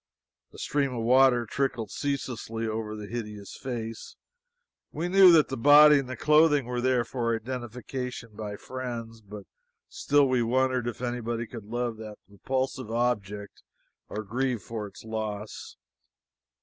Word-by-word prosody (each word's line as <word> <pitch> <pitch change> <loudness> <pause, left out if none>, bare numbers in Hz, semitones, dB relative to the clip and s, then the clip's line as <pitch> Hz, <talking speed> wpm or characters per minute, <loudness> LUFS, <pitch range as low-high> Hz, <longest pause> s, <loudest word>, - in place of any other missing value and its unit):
A - - -14
stream 140 -3 -1
of 115 - -3
water 125 0 +5
trickled 120 -3 -2
ceaselessly 120 -5 -3
over 110 -1 -3
the 105 -1 -7
hideous 105 -3 -7
face. 115 -3 -6 0.8
We 165 +3 -3
knew 190 0 +8
that 155 -3 +5
the 135 - -3
body 145 +3 +8
and 130 -2 -5
the 130 - -5
clothing 150 -1 +4
were 125 0 -3
there 125 -1 +2
for 115 -1 -1
identification 125 0 -6
by 105 -1 -5
friends, 115 -2 -6
but 105 -1 -10 0.5
still 145 -1 +2
we 130 -2 +2
wondered 130 +1 +1
if 120 +1 -5
anybody 120 -1 -2
could 115 -2 -9
love 120 +1 -3
that 110 -1 -9
repulsive 130 +3 -3
object 105 -4 -2 0.5
or 110 - -4
grieve 125 +2 -2
for 110 -2 -5
its 100 - -13
loss. 110 -1 -5
120 Hz, 145 wpm, -27 LUFS, 110-130 Hz, 0.8 s, knew